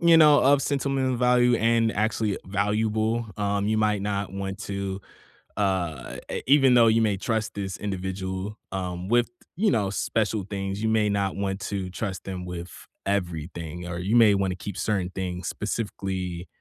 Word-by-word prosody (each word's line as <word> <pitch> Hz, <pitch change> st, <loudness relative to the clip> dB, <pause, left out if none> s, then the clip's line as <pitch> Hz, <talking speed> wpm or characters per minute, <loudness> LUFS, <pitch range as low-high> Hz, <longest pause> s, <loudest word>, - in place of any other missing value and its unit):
you 170 Hz, -1 st, +6 dB
know, 150 Hz, -2 st, +7 dB
of 140 Hz, +1 st, +5 dB
sentimental 135 Hz, -2 st, 0 dB
value 125 Hz, 0 st, +4 dB
and 115 Hz, 0 st, +2 dB
actually 110 Hz, -1 st, 0 dB
valuable, 110 Hz, +3 st, 0 dB
um, 100 Hz, -1 st, 0 dB
you 110 Hz, +1 st, +1 dB
might 105 Hz, -2 st, +1 dB
not 100 Hz, -1 st, -2 dB
want 95 Hz, 0 st, -4 dB
to, 100 Hz, -1 st, -4 dB, 0.6 s
uh, 90 Hz, -, -1 dB
e -, -, -2 dB
even 135 Hz, -2 st, +6 dB
though 120 Hz, -2 st, +6 dB
you 115 Hz, +1 st, +4 dB
may 105 Hz, -3 st, +2 dB
trust 110 Hz, +2 st, -1 dB
this 95 Hz, -2 st, -4 dB
individual, 95 Hz, +1 st, -4 dB
um, 90 Hz, -1 st, -4 dB
with, 120 Hz, +2 st, +3 dB, 0.3 s
you 215 Hz, +3 st, +2 dB
know, 105 Hz, -5 st, +1 dB
special 105 Hz, +1 st, 0 dB
things, 95 Hz, 0 st, -3 dB
you 110 Hz, -, +2 dB
may 110 Hz, -1 st, +3 dB
not 100 Hz, -1 st, 0 dB
want 95 Hz, -1 st, -2 dB
to 95 Hz, -1 st, -3 dB
trust 95 Hz, -1 st, -4 dB
them 90 Hz, -2 st, -5 dB
with 90 Hz, 0 st, -6 dB, 0.4 s
everything, 85 Hz, -3 st, -3 dB
or 85 Hz, 0 st, -4 dB
you 95 Hz, +6 st, 0 dB
may 115 Hz, -3 st, +7 dB
want 95 Hz, -1 st, +1 dB
to -, -, -3 dB
keep 95 Hz, +1 st, -7 dB
certain 95 Hz, -5 st, 0 dB
things 90 Hz, -1 st, -4 dB
specifically, 95 Hz, -5 st, -3 dB
100 Hz, 170 wpm, -26 LUFS, 95-110 Hz, 0.6 s, know